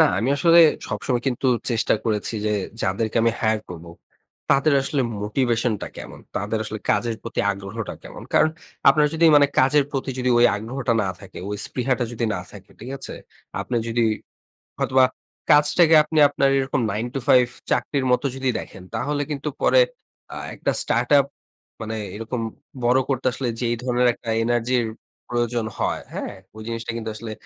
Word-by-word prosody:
না, - - +8
আমি 115 - 0
আসলে 170 +3 +5 0.3
সবসময় 125 -2 -1
কিন্তু 130 +1 -2 0.2
চেষ্টা 115 -1 +2
করেছি 110 -1 -1
যে - - +1 0.3
যাদেরকে 110 +4 -1
আমি 115 0 +3
hire 110 -1 +1
করব 85 -1 -9 0.6
তাদের 140 +2 +4
আসলে 140 +1 -1 0.2
মোটিভেশন 120 +2 +1
টা - - -3
কেমন? - - -9 0.2
তাদের 105 +3 -1
আসলে 110 0 -5
কাজের 120 -1 +1
প্রতি 115 - -3
আগ্রহটা 100 +2 -5
কেমন? - - -10
কারণ 155 - +4 0.4
আপনারা 150 -1 +5
যদি 165 +1 +2
মানে 145 -1 +6
কাজের 135 +2 +4
প্রতি 135 -1 -3 0.3
ওই 120 - +7
আগ্রহটা 120 +4 -2
না 100 - -1
থাকে, 95 -2 -11
ওই 105 - -3
স্পৃহাটা 125 -1 -1
যদি 120 0 -2
না - - -3
থাকে, 100 -2 -13
ঠিক 120 +4 -8
আছে? - - -6 0.5
আপনি 125 - -3
যদি 115 0 +1 0.7
হয়তোবা 130 0 +4 0.5
কাজটাকে 155 +2 +5
আপনি 155 +1 -1
আপনার 140 -1 +1
এরকম 135 0 0
9 110 +4 -2
to - - 0
5 125 -1 +5 0.2
চাকরির 140 -3 0
মত 125 - +2
যদি 135 0 -1
দেখেন। 95 - -9
তাহলে 145 +6 -1
কিন্তু 150 0 -3
পরে - - +5 0.5
আ - - -7 0.2
একটা - - -1
startup 140 -1 +3 0.6
মানে 110 0 -4 0.2
এরকম 115 +3 -4 0.4
বড় 125 +2 +4
করতে 130 -2 -1
আসলে 130 0 -3
যে 125 - -2
এই - - 0
ধরনের 125 0 +2
একটা 115 - -13 0.2
এনার্জির 120 +1 +1 0.5
প্রয়োজন 120 -1 0
হয়, - - -1
হ্যাঁ? - - -4 0.2
ওই 110 - -8
জিনিসটা 115 0 -4
কিন্তু 110 -1 -4
আসলে 110 0 -6
120 Hz, 170 wpm, -23 LUFS, 110-135 Hz, 0.7 s, না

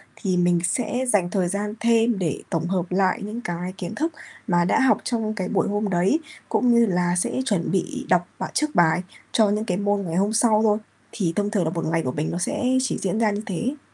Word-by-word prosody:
thì 185 -3 -1
mình 175 -1 +3
sẽ 245 +7 -1
dành 195 -6 +2
thời 185 -1 0
gian 205 +3 -2
thêm 230 -1 +3
để 165 -6 -2
tổng 165 0 -1
hợp 180 -1 0
lại 185 0 +2
những 215 +4 -5
cái 175 -1 -4
kiến 180 -2 -5
thức 320 +2 -1 0.3
mà 175 -1 +3
đã 185 - +2
học 265 -1 +4
trong 225 -3 -1
cái 190 -4 -3
buổi - - +1
hôm 205 0 -1
đấy, 185 - +2 0.3
cũng 245 -1 +2
như 235 0 +5
là 175 -2 +1
sẽ 220 - 0
chuẩn 200 -9 0
bị 190 - -2
đọc 175 -1 +3
bà - - -2
trước 305 0 0
bài 175 0 +4 0.3
cho 215 -3 +4
những 210 +1 0
cái 180 -4 -1
môn 205 0 0
ngày 165 -4 -4
hôm 200 +4 +1
sau 225 -1 +4
thôi, 210 -1 +3 0.3
thì 175 -6 -1
thông 205 0 0
thường 200 -5 +1
là 160 - 0
một 165 0 -3
ngày 165 +1 +1
của 125 - -2
mình 150 +4 -2
nó - - -3
sẽ 180 +8 -2 0.2
chỉ 260 - -1
diễn 195 +3 -1
ra 220 -2 +3
như 205 - -3
thế. 245 - -3
200 Hz, 240 wpm, -23 LUFS, 175-220 Hz, 0.3 s, như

